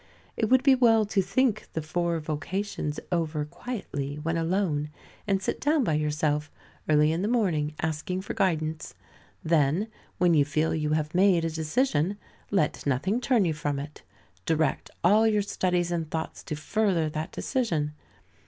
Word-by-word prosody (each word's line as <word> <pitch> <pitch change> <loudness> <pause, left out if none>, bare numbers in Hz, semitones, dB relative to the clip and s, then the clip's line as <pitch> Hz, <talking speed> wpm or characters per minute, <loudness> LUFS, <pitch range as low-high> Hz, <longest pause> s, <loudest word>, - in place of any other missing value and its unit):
It 220 - 0
would 260 0 +5
be 275 -1 +6
well 230 -4 +4
to 205 -1 +1
think 215 +3 +1
the 160 - -2
four 170 +1 -1
vocations 155 +1 -3
over 160 -3 0
quietly, 150 - -5
when 160 +3 -2
alone, 165 -3 0 0.4
and 195 -1 +2
sit - - -2
down 295 0 +3
by 160 - +1
yourself 150 0 0 0.4
early 150 0 +4
in 165 +2 -1
the 200 - 0
morning 170 -11 +1
asking 160 +4 -2
for 195 - -5
guidance. 160 -4 -1 0.5
Then, 160 +6 +2 0.3
when 180 -1 +4
you 150 -3 +5
feel 155 +3 0
you 155 -1 0
have 155 0 -1
made 180 -2 +4
a 165 - -1
decision, 160 - 0 0.3
let 190 -7 0
nothing 180 - 0
turn 245 -6 +3
you 165 - +1
from 145 -2 -2
it. 145 +2 -7 0.5
Direct 155 -3 0
all 210 +6 +5
your 210 -2 +2
studies 180 -3 0
and 165 -3 -2
thoughts 160 0 -4
to 150 - -3
further 175 +1 +1
that 155 +1 -4
decision. 165 - -1
165 Hz, 160 wpm, -27 LUFS, 150-200 Hz, 0.5 s, be